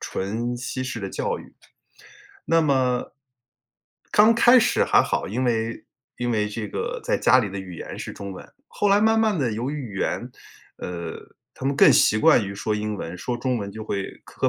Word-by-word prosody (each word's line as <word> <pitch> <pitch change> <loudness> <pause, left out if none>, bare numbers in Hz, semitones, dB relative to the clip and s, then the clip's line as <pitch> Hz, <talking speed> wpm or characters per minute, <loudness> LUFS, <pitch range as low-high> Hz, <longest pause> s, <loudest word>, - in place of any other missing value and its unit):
纯 115 +5 -3
西 125 +1 -4
式 125 -2 -4
的 95 -2 -5
教 - - -2
育， - - -14 0.9
那 165 0 +3
么 130 -4 +1 1.0
刚 215 +2 +6
开 240 +2 +7
始 220 - +2
还 - - +4
好， - - -2
因 125 +6 -2
为 115 -1 -1 0.3
因 120 0 -2
为 105 -2 0
这 105 +1 -5
个 - - -4
在 - - +1
家 130 - +5
里 110 - 0
的 100 - -5
语 95 -2 -8
言 - - -8
是 - - -6
中 100 -1 -7
文， 95 - -10 0.2
后 205 - 0
来 200 +1 +4
慢 220 +1 +3
慢 215 -5 +2
地 120 -5 0
由 120 +6 -3
于 - - -4 0.2
语 - - -6
言， - - -2 0.5
呃， 85 -2 -5 0.4
他 130 - -5
们 140 - +1
更 - - +7
习 110 - +4
惯 125 -4 +5
于 100 - -6
说 105 +2 -2
英 105 0 -2
文， 85 -2 -6
说 120 +6 -3
中 125 0 -1
文 100 -1 -5
就 110 +1 -8
会 100 -2 -4
磕 - - -1
120 Hz, 220 characters per minute, -24 LUFS, 100-135 Hz, 1.0 s, 开